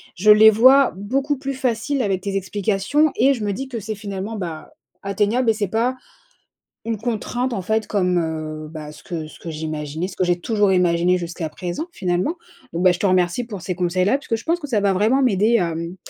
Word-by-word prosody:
je 210 Hz, +4 st, +5 dB
les 215 Hz, +1 st, +8 dB
vois 260 Hz, +5 st, +6 dB
beaucoup 270 Hz, +8 st, -1 dB
plus 275 Hz, +1 st, -4 dB
facile 255 Hz, +1 st, -1 dB
avec 195 Hz, -5 st, 0 dB
tes 200 Hz, 0 st, -3 dB
explications 200 Hz, -, +1 dB
et 275 Hz, +1 st, +4 dB
je 225 Hz, -, -5 dB
me 205 Hz, -, 0 dB
dis 265 Hz, +7 st, -5 dB
que 245 Hz, -3 st, -5 dB
c'est 215 Hz, +1 st, -5 dB
finalement, 200 Hz, +1 st, -5 dB
bah, 165 Hz, -5 st, -6 dB, 0.3 s
atteignable 205 Hz, +5 st, +1 dB
et -, -, +5 dB
c'est 210 Hz, -2 st, -2 dB
pas 230 Hz, +6 st, 0 dB, 0.9 s
une 225 Hz, -1 st, -1 dB
contrainte, 240 Hz, +3 st, -2 dB
en 195 Hz, -, -3 dB
fait, 220 Hz, +2 st, 0 dB
comme, 180 Hz, -3 st, +1 dB
heu, 155 Hz, -1 st, -4 dB
bah, 155 Hz, -1 st, -8 dB
ce 150 Hz, -, -14 dB
que 165 Hz, -3 st, -5 dB
ce 155 Hz, -, -13 dB
que 170 Hz, -, -7 dB
j'imaginais, 155 Hz, +1 st, -4 dB
ce -, -, -10 dB
que -, -, 0 dB
j'ai 175 Hz, -1 st, +1 dB
toujours 205 Hz, 0 st, +1 dB
imaginé 180 Hz, 0 st, +3 dB
jusqu'à 170 Hz, -2 st, -5 dB
présent, 175 Hz, -, -5 dB
finalement. 180 Hz, -, -1 dB, 0.4 s
Bon, 170 Hz, -, -2 dB
bah, 185 Hz, 0 st, +6 dB
je 175 Hz, -, -3 dB
te 200 Hz, -, +2 dB
remercie 185 Hz, +4 st, +1 dB
pour 205 Hz, -7 st, -8 dB
ces 185 Hz, -, -2 dB
conseils-là 185 Hz, +7 st, +1 dB
puisque 235 Hz, -, -2 dB
je 225 Hz, -, -7 dB
pense 335 Hz, +2 st, 0 dB
que 295 Hz, -, -7 dB
ça 225 Hz, -7 st, +1 dB
va 200 Hz, -1 st, +2 dB
vraiment 220 Hz, +8 st, +2 dB
m'aider 220 Hz, 0 st, +3 dB
à, 170 Hz, -5 st, 0 dB
mmh, 170 Hz, +2 st, -5 dB
200 Hz, 220 wpm, -21 LUFS, 175-230 Hz, 0.9 s, les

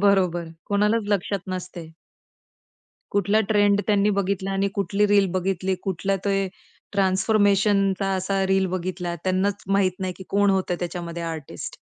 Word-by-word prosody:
बरोबर, 180 Hz, -4 st, +2 dB, 0.2 s
कोणालाच 210 Hz, +2 st, +2 dB
लक्षात 200 Hz, -1 st, 0 dB
नसतं. 180 Hz, -2 st, -5 dB, 1.2 s
कुठला 205 Hz, +2 st, +2 dB
ट्रेंड 205 Hz, -1 st, +4 dB
त्यांनी 205 Hz, 0 st, +3 dB
बघितला 195 Hz, 0 st, -1 dB
आणि 195 Hz, 0 st, +1 dB
कुठली 200 Hz, +2 st, +1 dB
रील 200 Hz, -1 st, +4 dB
बघितली, 185 Hz, 0 st, 0 dB
कुठला 195 Hz, +1 st, -1 dB
ते 195 Hz, -1 st, +1 dB, 0.4 s
ट्रान्सफॉर्मेशनचा 195 Hz, 0 st, +2 dB
असा 190 Hz, +1 st, 0 dB
रील 190 Hz, 0 st, +2 dB
बघितला, 180 Hz, -1 st, -3 dB
त्यांनाच 190 Hz, +2 st, 0 dB
माहीत 195 Hz, -1 st, +2 dB
नाही, 185 Hz, -1 st, -2 dB
की 190 Hz, -, -10 dB
कोण 200 Hz, 0 st, +3 dB
होतं 190 Hz, -2 st, 0 dB
त्याच्यामध्ये 170 Hz, -1 st, -4 dB
आर्टिस्ट. 160 Hz, -4 st, -6 dB
195 Hz, 130 wpm, -24 LUFS, 185-200 Hz, 1.2 s, ट्रेंड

